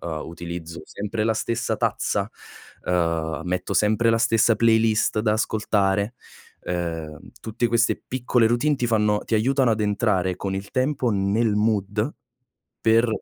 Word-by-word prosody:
uhm, 80 -3 -4
utilizzo 85 0 -7
sempre 105 +2 -4
la 115 - +2
stessa 115 0 -2
tazza, 105 -2 -1 0.5
uhm, 85 -3 -1
metto 90 +2 -2
sempre 110 +4 +3
la 115 - +2
stessa 115 0 +3
playlist 110 -1 +3
da 105 -1 +1
ascoltare. 105 -1 0 0.5
Uhm, 80 -4 -4 0.2
tutte 115 +2 -2
queste 115 +1 +1
piccole 125 -2 +2
routine 135 +6 +2
ti 125 - -1
fanno 105 -2 +2
ti - - -3
aiutano 130 +3 +2
ad 110 -1 0
entrare 105 -3 +1
con 95 -1 -3
il 100 +1 -7
tempo 130 -1 0
nel 105 +2 +1
mood 105 +3 0 0.7
per 115 +1 +3
105 Hz, 140 wpm, -23 LUFS, 95-115 Hz, 0.7 s, sempre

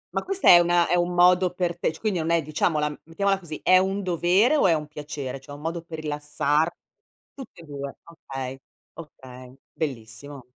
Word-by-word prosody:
Ma - - +1
questa 390 0 -1
è 175 - +10
una 175 0 +3
è - - 0
un 175 0 0
modo 180 0 +4
per 175 -2 -1
te - - +1
c 160 - -13
quindi 210 -5 -1
non 160 0 -2
è 170 0 +3
diciamola 150 0 0 0.2
mettiamola 195 +4 0
così, 160 -4 -8
è 185 0 +6
un 195 +2 -1
dovere 185 - +3
o 240 - +4
è 170 - +4
un 150 -1 -3
piacere? 145 -3 -6
Cioè 145 +2 -11
un 145 - -12
modo 165 +2 -3
per 165 -1 -9
rilassar 150 +1 0 0.6
tutte 265 -10 -12
e 165 - -13
2, 140 -1 -7
okay, 135 -5 -8 0.3
okay. 130 -5 -12 0.2
Bellissimo. 135 0 -6
165 Hz, 195 wpm, -25 LUFS, 145-180 Hz, 0.6 s, è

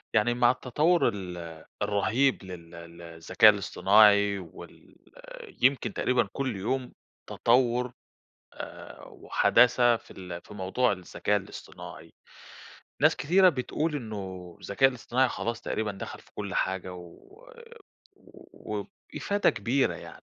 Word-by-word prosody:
يعني 110 +2 +3
مع 120 0 +4
التطور 150 +8 +1
ال 90 -3 -7 0.4
الرهيب 105 +6 +1
لل 90 -3 -10 0.3
ل - - -12
الذكاء 85 +5 +4
الاصطناعي 100 0 +4
وال 85 -4 -13 0.7
يمكن 130 +1 +2
تقريبًا 125 -4 +1
كُلّ 130 -5 -2
يوم 125 +6 -3 0.4
تطوُر 125 0 +1 0.6
آآ، - - -10
وحداثة 120 -1 +3
في - - -17
ال 90 -2 -8
في 105 - -13
موضوع 105 +6 0
الذكاء 100 +2 -2
الاصطناعي، 95 -1 -9 0.9
ناس - - +4
كتيرة 185 +5 +4
بتقول 150 +1 -1
إنه 95 -8 -7
الذكاء 135 +7 +3
الاصطناعي 130 +1 0
خلاص 115 0 -4
تقريبًا 110 -2 -3
دخل 95 - -8
في - - -23
كُلّ 100 -1 -5
حاجة 95 -1 -2
و 240 - -14 1.1
وبإفادة 205 0 -2
كبيرة 125 +7 0
يعني، - - -12
110 Hz, 115 wpm, -27 LUFS, 95-125 Hz, 1.1 s, مع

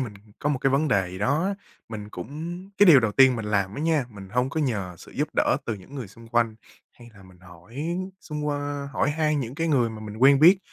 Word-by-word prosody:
mình 115 -5 -4 0.2
có 145 - -1
một 145 - 0
cái 135 +1 +1
vấn 145 +3 +2
đề 100 -6 +2
gì 95 - -8
đó 140 - +1
á, 200 +1 0 0.3
mình 105 -2 -7
cũng 160 - -6 0.2
cái 205 - +7
điều 145 -6 +9
đầu 110 -3 0
tiên 130 -2 +6
mình 115 - -4
làm 100 -1 0
á - - -5
nha, 155 -4 +1
mình 100 -2 -11
hông 125 +5 0
có 160 - -2
nhờ 105 -10 -2
sự - - -14
giúp - - -1
đỡ - - +3
từ 110 - -1
những 100 +8 -13
người 130 -7 -6
xung 115 +3 -15
quanh 115 -1 +1 0.4
hay 120 -1 -15
là 95 - -16
mình 95 -1 -18
hỏi 90 - -9 0.3
xung 150 -1 -5
qua 145 -1 -3
hỏi 140 - +1
han 155 -1 0
những 125 +1 -5
cái 165 +1 -1
người 125 -6 +2
mà 110 - -9
mình 105 0 -8
quen 135 +3 +5
biết, 180 +5 +8
130 Hz, 255 wpm, -25 LUFS, 105-145 Hz, 0.4 s, điều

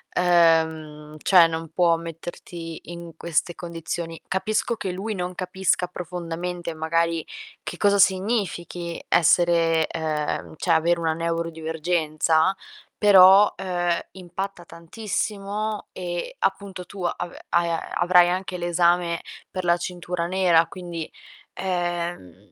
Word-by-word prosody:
uhm, 160 -3 +2
cioè 180 -3 +7
non 165 -1 -5
può 170 -2 +4
metterti 165 0 -8
in 170 -2 -9
queste 170 +1 -1
condizioni. 165 -1 -5
Capisco 215 +5 0
che 190 -4 -4
lui 205 +4 -4
non 180 -1 -4
capisca 185 0 0
profondamente, 175 -1 -5
magari, 165 +1 0 0.4
che - - -6
cosa 200 -1 +3
significhi 185 -4 0
essere 165 -1 +3
uhm, 155 -1 -2
cioè 175 - 0
avere 170 +1 +3
una 160 -1 0
neurodivergenza, 165 0 0 0.4
però, 195 0 +7
uhm, 175 -2 0
impatta 190 0 -6
tantissimo, 210 +3 -4
e 175 -1 -5
appunto 195 -2 -2
tu 190 0 -8
ave 175 0 -4
hai 170 0 +2
a-avrai 175 +1 +3
anche 185 0 -2
l'esame 175 0 +1 0.3
per 185 -1 -4
la 170 - +4
cintura 175 -1 -4
nera, 175 -3 +4
quindi, 170 -2 -7 0.4
ehm, 175 - -4
175 Hz, 110 wpm, -24 LUFS, 165-185 Hz, 0.4 s, cioè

